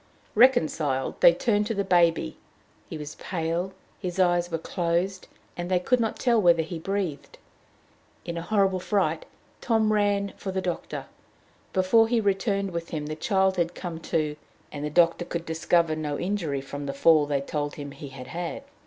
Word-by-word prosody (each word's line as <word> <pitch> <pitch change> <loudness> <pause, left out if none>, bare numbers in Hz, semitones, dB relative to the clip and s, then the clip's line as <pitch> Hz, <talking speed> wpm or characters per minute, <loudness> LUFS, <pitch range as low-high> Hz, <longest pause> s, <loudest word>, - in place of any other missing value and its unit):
Reconciled, 155 - +2
they - - +9
turned 210 - +1
to 225 - -2
the 200 - 0
baby. 170 - +2 0.5
He - - -5
was 150 0 -7
pale, 170 +1 -2 0.3
his 180 -2 -4
eyes 175 -1 +3
were 165 - -1
closed, 175 +3 -1 0.3
and 175 0 -4
they 185 -1 +3
could 250 +7 +2
not 225 -2 -1
tell 235 -3 +3
whether 170 -3 +5
he 165 +1 -6
breathed. 185 -4 -3 0.9
In 170 - -4
a 170 - -3
horrible 195 0 +1
fright, 180 -5 0 0.4
Tom 220 -2 +2
ran 205 -1 +1
for 190 - -4
the 190 - -1
doctor. 180 -2 -4 0.7
Before 210 +4 +4
he 235 0 +2
returned 200 -1 0
with 170 -1 -4
him, 150 -2 -4
the 155 +1 -4
child 190 +3 +1
had 170 -1 0
come 170 -3 -5
to, 150 -2 0 0.3
and 145 -1 -6
the 150 - -1
doctor 170 +2 +3
could 170 -1 -5
discover 160 0 +1
no 150 -2 -3
injury 175 -8 -2
from 145 +1 -6
the 140 - -2
fall 155 0 +5
they 145 -1 +1
told 145 +1 -3
him 145 -1 -7
he 140 +1 -9
had 135 -1 -9
had. 175 +9 -4
175 Hz, 180 wpm, -26 LUFS, 155-195 Hz, 0.9 s, they